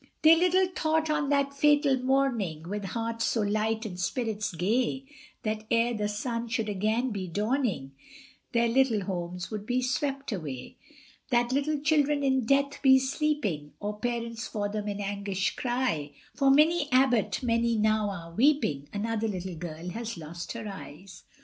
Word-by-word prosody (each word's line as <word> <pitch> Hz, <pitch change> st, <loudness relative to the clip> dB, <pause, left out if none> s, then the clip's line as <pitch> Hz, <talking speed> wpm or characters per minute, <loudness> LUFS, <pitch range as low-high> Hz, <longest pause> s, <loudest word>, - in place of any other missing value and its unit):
They 320 Hz, +1 st, +9 dB
little 365 Hz, +2 st, +3 dB
thought 315 Hz, -1 st, +1 dB
on 300 Hz, -2 st, 0 dB
the 280 Hz, -1 st, +3 dB
fatal 290 Hz, -1 st, +4 dB
morning, 240 Hz, -, 0 dB
With 205 Hz, +1 st, -4 dB
hearts 230 Hz, +3 st, -2 dB
so 225 Hz, -, +1 dB
light 215 Hz, +2 st, 0 dB
and 180 Hz, -4 st, -6 dB
spirits 215 Hz, +2 st, -2 dB
gay 230 Hz, +10 st, 0 dB, 0.4 s
That 215 Hz, 0 st, -2 dB
ere 235 Hz, +1 st, +2 dB
the 210 Hz, -2 st, -1 dB
sun 230 Hz, +3 st, -3 dB
should 225 Hz, -1 st, -1 dB
again 215 Hz, +5 st, 0 dB
be 195 Hz, -3 st, -4 dB
dawning, 210 Hz, -, -1 dB, 0.6 s
Their 235 Hz, -1 st, +3 dB
little 235 Hz, -3 st, +3 dB
homes 180 Hz, 0 st, -4 dB
would 210 Hz, -2 st, -4 dB
be 255 Hz, +1 st, +1 dB
swept 275 Hz, +1 st, -1 dB
away; 145 Hz, -, -6 dB, 0.5 s
That 240 Hz, -1 st, +2 dB
little 285 Hz, +3 st, 0 dB
children 295 Hz, -1 st, +2 dB
in 265 Hz, -4 st, +1 dB
death 280 Hz, +1 st, +2 dB
be 265 Hz, -2 st, +7 dB
sleeping, 265 Hz, -, -1 dB
Or 210 Hz, 0 st, -4 dB
parents 235 Hz, 0 st, -3 dB
for 205 Hz, -1 st, -2 dB
them 210 Hz, 0 st, -4 dB
in 205 Hz, 0 st, -3 dB
anguish 200 Hz, -1 st, -2 dB
cry, 240 Hz, -, -1 dB, 0.2 s
For 275 Hz, -2 st, +2 dB
Minnie 300 Hz, +2 st, +4 dB
Abbot 255 Hz, -2 st, +3 dB
many 235 Hz, -1 st, +2 dB
now 215 Hz, -1 st, +2 dB
are 170 Hz, -4 st, -7 dB
weeping, 220 Hz, -, +2 dB
Another 225 Hz, +1 st, -1 dB
little 185 Hz, -3 st, -4 dB
girl 165 Hz, +1 st, -6 dB
has 230 Hz, +1 st, -5 dB
lost 170 Hz, +2 st, -7 dB
her 230 Hz, -2 st, -6 dB
eyes. 185 Hz, -1 st, -10 dB
230 Hz, 160 wpm, -28 LUFS, 200-265 Hz, 0.6 s, They